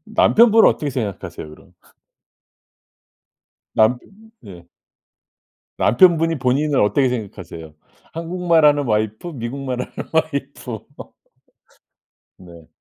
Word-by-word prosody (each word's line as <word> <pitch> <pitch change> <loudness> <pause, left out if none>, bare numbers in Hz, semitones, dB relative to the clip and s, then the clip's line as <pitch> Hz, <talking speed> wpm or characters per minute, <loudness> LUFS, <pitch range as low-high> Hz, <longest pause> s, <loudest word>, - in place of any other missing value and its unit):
남편분은 225 0 +5
어떻게 150 - -3
생각하세요 105 - -6
그럼? 80 +4 -17 2.0
남펴 115 +3 +3 0.5
예. 85 -3 -13 1.1
남편분이 165 - +3
본인을 140 +3 +1
어떻게 130 +6 +2
생각하세요? 90 -9 -7 0.4
한국말 170 -1 +1
하는 145 -1 +3
와이프, 110 +5 -2
미국말 125 +1 -4
하는 - - -9 0.2
와이프. 140 -7 -3 1.6
네. 85 -3 -15
125 Hz, 230 characters per minute, -20 LUFS, 105-155 Hz, 2.0 s, 남편분은